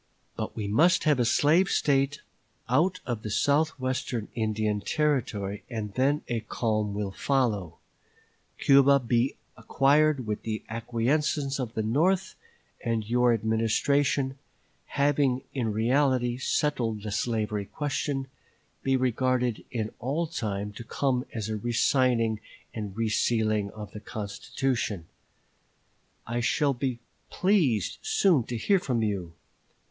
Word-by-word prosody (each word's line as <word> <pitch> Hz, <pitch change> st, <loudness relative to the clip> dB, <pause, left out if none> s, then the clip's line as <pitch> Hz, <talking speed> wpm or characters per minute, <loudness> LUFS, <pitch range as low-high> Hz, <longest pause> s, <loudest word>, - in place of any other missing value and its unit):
But -, -, -4 dB
we 105 Hz, -2 st, -3 dB
must 155 Hz, -, +4 dB
have 150 Hz, -4 st, +3 dB
a 120 Hz, -, +3 dB
slave 160 Hz, +10 st, +4 dB
State 140 Hz, +1 st, +1 dB, 0.5 s
out 170 Hz, +9 st, +2 dB
of 120 Hz, -3 st, -3 dB
the 110 Hz, -, -5 dB
south 145 Hz, +7 st, +1 dB
western 130 Hz, -3 st, -2 dB
Indian 110 Hz, -2 st, 0 dB
Territory, 110 Hz, -9 st, -1 dB
and 110 Hz, -4 st, -4 dB
then 140 Hz, +5 st, +1 dB
a 120 Hz, -2 st, -1 dB
calm 110 Hz, -2 st, -1 dB
will 100 Hz, -1 st, -2 dB
follow; 110 Hz, -, 0 dB, 0.8 s
Cuba 140 Hz, 0 st, +5 dB
be 120 Hz, +1 st, +1 dB, 0.2 s
acquired 140 Hz, -1 st, +2 dB
with 105 Hz, -1 st, -3 dB
the 110 Hz, -1 st, -4 dB
acquiescence 135 Hz, +5 st, 0 dB
of 120 Hz, -3 st, -4 dB
the 110 Hz, -, 0 dB
North; 175 Hz, -, +1 dB, 0.5 s
and 115 Hz, -2 st, -1 dB
your 125 Hz, +1 st, +3 dB
Administration, 130 Hz, +5 st, +1 dB, 0.5 s
having 140 Hz, -2 st, +1 dB
in 120 Hz, -5 st, -1 dB
reality 125 Hz, +2 st, +1 dB
settled 120 Hz, -8 st, 0 dB
the 105 Hz, -, -4 dB
slavery 105 Hz, -2 st, -1 dB
question, 140 Hz, +2 st, -2 dB, 0.6 s
be 135 Hz, 0 st, +2 dB
regarded 125 Hz, -1 st, 0 dB
in 110 Hz, -3 st, -3 dB
all 140 Hz, +8 st, -1 dB
time 105 Hz, -10 st, -3 dB
to 110 Hz, -, -8 dB
come 130 Hz, +2 st, -1 dB
as 110 Hz, -3 st, -4 dB
a 110 Hz, -1 st, -2 dB
re 120 Hz, +3 st, -3 dB
signing 120 Hz, -3 st, +2 dB, 0.3 s
and 105 Hz, -2 st, -6 dB
re 115 Hz, 0 st, +1 dB
sealing 110 Hz, -2 st, +1 dB
of 105 Hz, -1 st, -8 dB
the 105 Hz, -, -8 dB
constitution.... 105 Hz, -1 st, -3 dB, 1.2 s
I 120 Hz, +1 st, -2 dB
shall 140 Hz, +4 st, +2 dB
be 130 Hz, -1 st, -2 dB, 0.3 s
pleased 170 Hz, -, +1 dB
soon 195 Hz, -, +3 dB
to 120 Hz, -, -4 dB
hear 195 Hz, -, +3 dB
from 125 Hz, -9 st, -1 dB
you. 95 Hz, -6 st, -2 dB
120 Hz, 130 wpm, -27 LUFS, 110-140 Hz, 1.2 s, Cuba